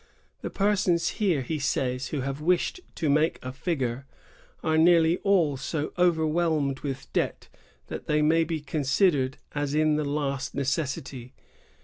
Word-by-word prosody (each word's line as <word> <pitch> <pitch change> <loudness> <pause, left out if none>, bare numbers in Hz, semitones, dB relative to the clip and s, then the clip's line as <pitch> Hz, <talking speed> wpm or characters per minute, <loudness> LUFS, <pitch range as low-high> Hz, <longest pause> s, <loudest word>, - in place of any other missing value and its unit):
2 - - -4
"The - - -4
persons 190 -4 +1
here," 175 -10 +2
he 155 +4 -3
says, 130 -2 -1
"who 145 - -3
have 135 +2 -4
wished 180 - +1 0.2
to 160 - -1
make 150 +3 +2
a 130 - -4
figure 135 -3 -3 0.6
are 160 - +1
nearly 165 +1 +5
all 175 -9 +2
so 145 +3 -3
overwhelmed 160 -5 +1
with 135 -2 -6
debt - - -2 0.4
that - - -7
they 150 0 +2
may 165 +2 +4
be 160 -1 -3
considered 140 -1 +1 0.2
as 145 0 -2
in 155 -1 +3
the 155 - 0
last 140 -1 -2
necessity." 135 -3 -3
150 Hz, 150 wpm, -27 LUFS, 135-165 Hz, 0.6 s, nearly